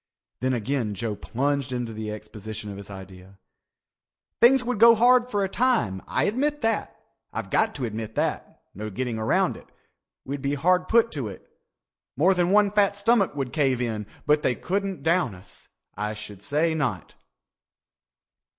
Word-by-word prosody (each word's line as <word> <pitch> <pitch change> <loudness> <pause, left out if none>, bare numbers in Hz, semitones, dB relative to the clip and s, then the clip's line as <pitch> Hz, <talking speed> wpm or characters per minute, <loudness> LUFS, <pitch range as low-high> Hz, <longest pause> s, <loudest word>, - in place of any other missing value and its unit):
Then 130 0 0
again 115 -2 -2
Joe 105 +1 -3
plunged 140 +4 -2
into 120 -2 -3
the 110 0 -5
exposition 105 0 -7
of 100 - -8
his 100 0 -10
idea. 95 0 -11 1.0
"Things 250 +2 +7
would 245 -3 -2
go 230 +1 +8
hard 245 +2 +4
for 205 -4 0
a - - +1
time. 220 - +1
I - - 0
admit 290 +7 0
that. 225 0 -1 0.3
I've - - -5
got 220 0 +2
to 130 - -2
admit 110 0 -5
that. - - -3
No 110 +3 -6
getting 115 +1 -3
around 110 - +1
it. - - -15 0.6
We'd 140 +1 -4
be 140 +1 -1
hard 180 +5 +2
put 230 0 +4
to 135 -7 -4
it. 95 - -10 0.7
More 180 +7 +4
than 175 -1 +1
one 205 0 +4
fat 200 -1 +2
stomach 205 -5 +2
would 135 -3 -3
cave 135 -5 +1
in. 110 -4 -3 0.2
But 150 0 +3
they 125 - +1
couldn't 195 -5 -3
down 165 - +1
us. 90 - -12 0.3
I 105 +1 -3
should 105 -2 -9
say 150 +8 +1
not." 125 - -2
140 Hz, 170 wpm, -25 LUFS, -, 1.0 s, go